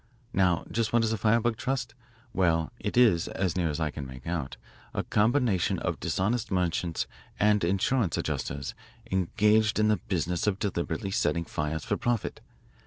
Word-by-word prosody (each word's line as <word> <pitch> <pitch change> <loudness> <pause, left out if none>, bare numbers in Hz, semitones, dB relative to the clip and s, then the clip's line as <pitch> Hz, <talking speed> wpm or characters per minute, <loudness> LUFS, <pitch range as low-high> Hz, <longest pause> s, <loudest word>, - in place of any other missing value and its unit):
Now 90 -3 +2
just 115 -1 0
what 120 -1 +3
is 110 0 +1
a - - -1
firebug 115 +2 +2
trust? 135 0 -2 0.4
Well, 80 -2 +1
it 105 - -3
is, 110 -9 +5
as 95 -3 -1
near 85 -3 +1
as 75 - -3
I 80 -2 0
can 70 -2 -6
make 65 -1 -11
out, 80 -5 -3 0.4
a - - 0
combination 110 -3 +2
of - - -2
dishonest 110 +5 0
merchants 90 -2 0 0.3
and 105 -1 +4
insurance 95 +3 +1
adjusters 70 -2 -3 0.4
engaged 105 +4 +3
in 105 0 +3
the 105 - +3
business 90 0 -2
of 100 -2 +2
deliberately 100 +1 -2
setting 85 -3 +1
fires 75 0 -3
for 100 -3 0
profit. 120 -3 -1
95 Hz, 165 wpm, -28 LUFS, 85-110 Hz, 0.4 s, is